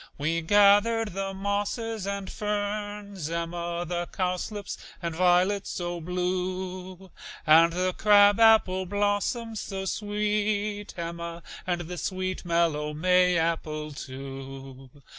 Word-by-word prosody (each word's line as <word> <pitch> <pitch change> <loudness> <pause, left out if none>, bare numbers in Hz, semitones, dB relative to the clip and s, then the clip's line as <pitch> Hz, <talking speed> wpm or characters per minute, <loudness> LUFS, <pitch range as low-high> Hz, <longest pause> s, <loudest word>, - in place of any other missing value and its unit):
We 160 +4 0
gathered 205 +5 +4
the 195 +1 -3
mosses 200 +2 -2
and 200 -1 -3
ferns, 205 -4 -3
Emma, 170 +1 -3
The 175 0 -2
cowslips 190 +2 -3 0.2
and 170 -2 -3
violets 185 +3 +3
so 175 -1 -4
blue, 185 +1 -3 0.3
And 165 +2 +7
the 185 +2 0
crab 205 0 +5
apple 215 -5 +5
blossoms 205 +3 -1
so 190 -1 -5
sweet, 210 0 -1
Emma, 170 0 -5 0.2
And 175 -1 0
the 175 +1 -6
sweet, 185 -1 -3
mellow 160 -3 +1
May 180 +2 +4
apple, 155 -2 -1
too. 135 -1 -8
185 Hz, 110 wpm, -27 LUFS, 170-205 Hz, 0.3 s, And